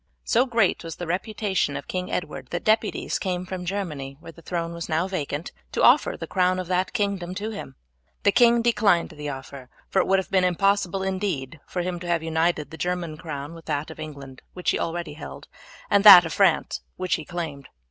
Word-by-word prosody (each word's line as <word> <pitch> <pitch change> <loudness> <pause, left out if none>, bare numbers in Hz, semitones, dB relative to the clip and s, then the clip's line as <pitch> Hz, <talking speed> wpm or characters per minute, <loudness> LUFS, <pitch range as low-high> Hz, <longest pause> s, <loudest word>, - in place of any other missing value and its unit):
So 245 +4 +2
great 230 -8 +2
was 165 -1 -6
the 175 - -6
reputation 190 -2 -1
of - - -8
King 180 0 -3
Edward 150 -6 -4
that 175 - -3
deputies 220 0 +1
came 180 -2 -2
from 185 -1 -5
Germany, 155 -8 -4
where 165 - -11
the 165 - -16
throne 170 0 -3
was 170 0 -6
now 165 +3 +1
vacant, 160 -4 -4 0.2
to - - 0
offer - - +5
the - - -5
crown 185 -1 +1
of 185 - -3
that 185 +1 +1
kingdom 200 -5 -1
to 215 +3 -3
him. 200 -10 -8 0.5
The 200 - +5
king 235 +1 +5
declined 210 -7 +3
the 150 -2 -6
offer, 135 -1 -8 0.2
for 195 - +2
it - - +2
would 195 - +4
have 190 - -3
been 190 -1 +3
impossible 195 +1 +1
indeed 185 -8 -2
for 180 - -3
him 175 -1 -3
to 175 - -7
have 170 -2 0
united 160 -2 0
the 160 - -8
German 175 -1 -2
crown 150 -1 -6
with 165 -1 -12
that 150 0 -2
of 160 - -12
England, 140 -4 -9
which 180 - 0
he - - -1
already 170 -2 -3
held, 155 - -9 0.4
and 200 -1 +3
that 190 -5 +11
of 165 - -4
France, 190 -5 +2
which 185 -1 -2
he 155 - 0
claimed. 150 -5 -6
175 Hz, 210 wpm, -25 LUFS, 155-195 Hz, 0.5 s, that